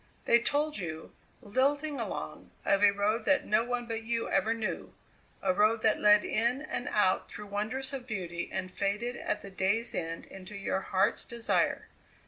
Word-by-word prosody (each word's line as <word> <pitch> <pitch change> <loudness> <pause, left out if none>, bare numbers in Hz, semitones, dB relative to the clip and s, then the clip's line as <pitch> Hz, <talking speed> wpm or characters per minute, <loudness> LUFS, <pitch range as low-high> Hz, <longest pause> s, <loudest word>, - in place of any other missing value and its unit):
They 235 - +6
told 290 +3 0
you, 160 -3 -6 0.3
lilting 280 +6 +1
along, - - -5 0.2
of 195 - +3
a 205 - +8
road 205 +3 0
that 285 -1 +3
no 215 +2 +3
one 245 0 -2
but 225 -1 -3
you 230 0 -1
ever 195 +3 +2
knew 230 -2 -3 0.5
a 190 -1 +3
road 215 +3 +3
that 220 - +3
led 210 0 +6
in 235 +4 +1
and 245 - -4
out 190 -3 +2
through 210 - -7
wonders 220 +7 -2
of 260 -2 -5
beauty 175 -6 -4
and 185 -1 -3
faded 210 +6 -1
at 210 - -3
the 200 - -9
day's 195 +5 0
end 165 -1 -3
into 195 +2 -10
your 195 -1 -1
heart's 190 0 +1
desire. 235 -1 0
215 Hz, 175 wpm, -30 LUFS, 195-240 Hz, 0.5 s, a